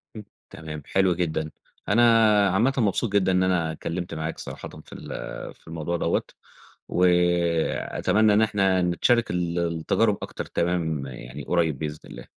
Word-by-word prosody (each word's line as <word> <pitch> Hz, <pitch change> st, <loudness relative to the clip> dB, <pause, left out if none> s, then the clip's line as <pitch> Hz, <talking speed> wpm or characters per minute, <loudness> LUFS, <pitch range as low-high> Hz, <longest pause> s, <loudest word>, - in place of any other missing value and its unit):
م 110 Hz, -, -6 dB, 0.3 s
تمام 75 Hz, -2 st, -8 dB
حلو 95 Hz, -2 st, +2 dB
جدًا. 80 Hz, -3 st, -2 dB, 0.4 s
أنا 110 Hz, +4 st, +4 dB, 0.5 s
عامةً 115 Hz, +9 st, +2 dB
مبسوط 105 Hz, -1 st, +1 dB
جدًا 95 Hz, -2 st, +3 dB
إن 90 Hz, 0 st, +2 dB
أنا 90 Hz, -3 st, +1 dB
اتكلّمت 85 Hz, +2 st, -5 dB
معاك 80 Hz, +1 st, -4 dB
صراحةً -, -, -7 dB, 0.2 s
في -, -, -12 dB
ال -, -, -10 dB, 0.5 s
في -, -, -25 dB
الموضوع 80 Hz, +1 st, -3 dB
دَوّة، -, -, 0 dB, 0.6 s
وأتمنى 90 Hz, +4 st, +2 dB
إن 105 Hz, -, +4 dB
إحنا 95 Hz, -4 st, +2 dB
نتشارك 100 Hz, +7 st, +2 dB
ال 85 Hz, -1 st, -1 dB
التجارب 85 Hz, +6 st, +1 dB
أكتر، -, -, -6 dB
تمام 80 Hz, -5 st, -1 dB
يعني 65 Hz, +2 st, -9 dB
قريّب 80 Hz, -5 st, 0 dB
بإذن 75 Hz, -1 st, -4 dB
الله. -, -, -10 dB
85 Hz, 145 wpm, -25 LUFS, 80-95 Hz, 0.6 s, أنا